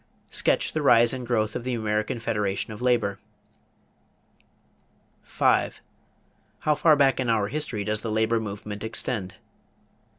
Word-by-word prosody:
Sketch - - +1
the 155 - -1
rise 120 -4 +5
and 125 -2 -5
growth 110 -3 0
of - - -3
the 125 0 -2
American 110 0 -1
Federation 105 -2 -2
of 105 - -10
Labor. 120 -6 +1 2.0
5. - - +1 0.8
How 150 - +2
far 155 +1 +4
back 135 -2 +3
in 125 -2 0
our 105 -3 +1
history 125 -8 -3
does 105 +1 -1
the 115 - -4
labor 110 +1 +1
movement 105 -1 -6
extend? 110 -3 -3
110 Hz, 135 wpm, -25 LUFS, 105-125 Hz, 2.0 s, rise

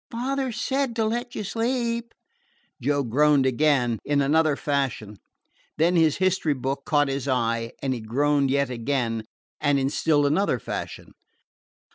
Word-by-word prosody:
"Father 260 +2 -2
said 265 +2 -1
to 225 -1 +1
let 240 +3 -3
you 215 - -3
sleep." 235 +2 -2 0.7
Joe 145 +2 +1
groaned 140 +3 +3
again, 130 -4 +2
in 145 0 +1
another 150 +2 +3
fashion 135 -8 -2 0.6
Then 170 +3 +3
his 160 -3 +3
history 185 -5 +1
book 135 +2 -3
caught 145 -1 +3
his 135 0 -3
eye, 115 -3 0
and 135 -1 0
he 125 - -4
groaned 140 +5 +1
yet 140 -1 +1
again 115 -2 -2 0.3
and 145 -1 +2
in 135 0 0
still 150 -2 +2
another 155 0 +1
fashion. - - -6
145 Hz, 145 wpm, -25 LUFS, 130-190 Hz, 0.7 s, groaned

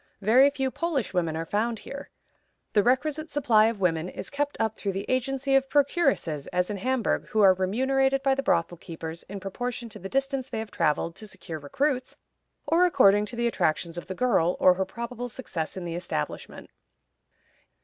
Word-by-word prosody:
Very 255 +7 +6
few 265 -2 -2
Polish 310 - -2
women 165 -3 0
are 165 - -3
found 225 +6 -1
here. 280 +6 -9 0.6
The 210 - +5
requisite 300 +7 0
supply 240 -7 +4
of 225 -2 -2
women 170 -2 0
is - - -7
kept 290 0 -2
up 220 -1 0
through 200 -2 -3
the 195 +2 -4
agency 270 +2 0
of 270 0 +2
procuresses, 275 - +1
as 180 +2 -1
in 205 - -3
Hamburg, 250 +2 0
who 215 - +1
are 195 -2 +7
remunerated 265 +8 +1
by 270 0 +3
the 270 - -1
brothel 170 -8 +1
keepers 165 -1 -7
in 200 0 -6
proportion 235 +5 -4
to 210 -1 -11
the 195 - -7
distance 270 0 -1
they - - -4
have 220 -1 -5
traveled 165 +1 0
to 215 - -9
secure 170 -5 -7
recruits, 255 - -1 0.5
or 345 +3 +4
according 205 - +4
to 240 - -6
the 235 0 -1
attractions 170 -6 0
of 175 - -7
the 190 - -5
girl, 180 -7 +2
or 185 - +6
her 190 +1 -1
probable 235 +4 -6
success 185 -10 -5
in 180 - -5
the 170 - -4
establishment. 170 - -5
220 Hz, 190 wpm, -26 LUFS, 185-265 Hz, 0.6 s, are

